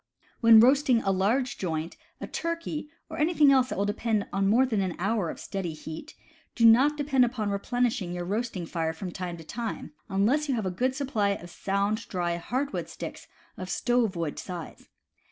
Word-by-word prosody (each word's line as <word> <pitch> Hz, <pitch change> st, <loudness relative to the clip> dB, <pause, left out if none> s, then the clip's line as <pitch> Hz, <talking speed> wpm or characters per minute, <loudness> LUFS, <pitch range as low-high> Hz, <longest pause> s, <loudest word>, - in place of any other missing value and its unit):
When 230 Hz, -2 st, +8 dB
roasting 255 Hz, 0 st, +4 dB
a 195 Hz, -, +2 dB
large 220 Hz, +8 st, 0 dB
joint, 165 Hz, -2 st, -3 dB, 0.2 s
a -, -, -5 dB
turkey, 335 Hz, -3 st, -4 dB, 0.2 s
or 320 Hz, 0 st, -7 dB
anything 305 Hz, -2 st, +4 dB
else 260 Hz, -2 st, +4 dB
that -, -, -4 dB
will 200 Hz, -, +1 dB
require 210 Hz, 0 st, 0 dB, 0.2 s
more 220 Hz, +7 st, +4 dB
than 220 Hz, -6 st, 0 dB
an 185 Hz, -3 st, -2 dB
hour 200 Hz, -1 st, 0 dB
of -, -, -7 dB
steady 185 Hz, -4 st, -4 dB
heat, 160 Hz, -, -9 dB, 0.4 s
do 230 Hz, -, +3 dB
not 265 Hz, +7 st, +6 dB
depend 275 Hz, -3 st, +3 dB
upon 230 Hz, -4 st, -1 dB
replenishing 235 Hz, -1 st, -1 dB
your 175 Hz, 0 st, -4 dB
roasting 205 Hz, -2 st, -2 dB
fire 160 Hz, -1 st, -2 dB
from 180 Hz, +2 st, -6 dB
time 180 Hz, -2 st, -5 dB
to 165 Hz, -, -10 dB
time, 230 Hz, +7 st, -5 dB, 0.2 s
unless 235 Hz, +10 st, +1 dB
you 265 Hz, -, +2 dB
have 220 Hz, -4 st, -2 dB
a 185 Hz, -, -1 dB
good 255 Hz, +8 st, 0 dB
supply 220 Hz, -8 st, 0 dB
of 175 Hz, -2 st, -10 dB
sound, 200 Hz, +4 st, -1 dB
dry 175 Hz, -2 st, -1 dB
hardwood 260 Hz, +11 st, -3 dB
sticks -, -, -8 dB, 0.3 s
of 185 Hz, 0 st, -6 dB
stove 240 Hz, -4 st, +1 dB
wood 165 Hz, -3 st, -3 dB
size. 175 Hz, -3 st, -8 dB
215 Hz, 185 wpm, -27 LUFS, 185-255 Hz, 0.4 s, When